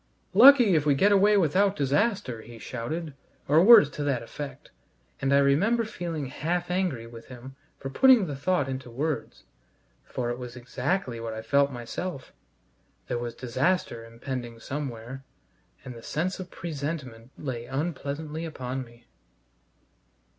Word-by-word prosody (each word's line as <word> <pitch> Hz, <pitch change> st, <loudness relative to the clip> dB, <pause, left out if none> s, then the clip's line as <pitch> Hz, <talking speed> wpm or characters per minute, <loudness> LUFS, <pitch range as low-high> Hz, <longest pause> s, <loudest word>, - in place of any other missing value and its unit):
"Lucky 255 Hz, -7 st, +8 dB
if 155 Hz, -3 st, +3 dB
we 145 Hz, -2 st, +3 dB
get 200 Hz, +9 st, +4 dB
away 205 Hz, +1 st, +5 dB
without 195 Hz, +3 st, +3 dB
disaster!" 145 Hz, -, 0 dB
he 115 Hz, +1 st, -12 dB
shouted, 140 Hz, +8 st, -5 dB, 0.3 s
or 155 Hz, +4 st, +5 dB
words 220 Hz, -, +9 dB
to 150 Hz, -, -4 dB
that 135 Hz, -5 st, 0 dB
effect; 145 Hz, +4 st, -8 dB, 0.5 s
and 135 Hz, 0 st, +1 dB
I 140 Hz, -, +6 dB
remember 195 Hz, +13 st, +3 dB
feeling 170 Hz, -8 st, -4 dB
half 175 Hz, +7 st, -2 dB
angry 180 Hz, -11 st, -1 dB
with 115 Hz, 0 st, -12 dB
him 130 Hz, +1 st, -11 dB, 0.2 s
for 135 Hz, -, -6 dB
putting 255 Hz, -, +6 dB
the 145 Hz, -4 st, -4 dB
thought 145 Hz, 0 st, 0 dB
into 130 Hz, -1 st, -5 dB
words, 145 Hz, +6 st, -3 dB, 0.6 s
for 120 Hz, -2 st, -3 dB
it 120 Hz, -, -5 dB
was 125 Hz, -1 st, -8 dB
exactly 125 Hz, +1 st, -2 dB
what 115 Hz, -1 st, -5 dB
I 110 Hz, -, -6 dB
felt 140 Hz, +4 st, +2 dB
myself. 130 Hz, +5 st, -6 dB, 0.8 s
There 120 Hz, -, -1 dB
was 120 Hz, -1 st, -5 dB
disaster 130 Hz, 0 st, -1 dB
impending 120 Hz, 0 st, -6 dB
somewhere, 130 Hz, -1 st, -6 dB, 0.6 s
and 125 Hz, -, -7 dB
the 115 Hz, -, -11 dB
sense 175 Hz, +11 st, -2 dB
of 185 Hz, -1 st, -7 dB
presentiment 140 Hz, -9 st, -6 dB
lay 120 Hz, -5 st, -5 dB
unpleasantly 150 Hz, +2 st, -4 dB
upon 130 Hz, -5 st, -4 dB
me. 120 Hz, -1 st, -18 dB
140 Hz, 145 wpm, -27 LUFS, 120-175 Hz, 0.8 s, words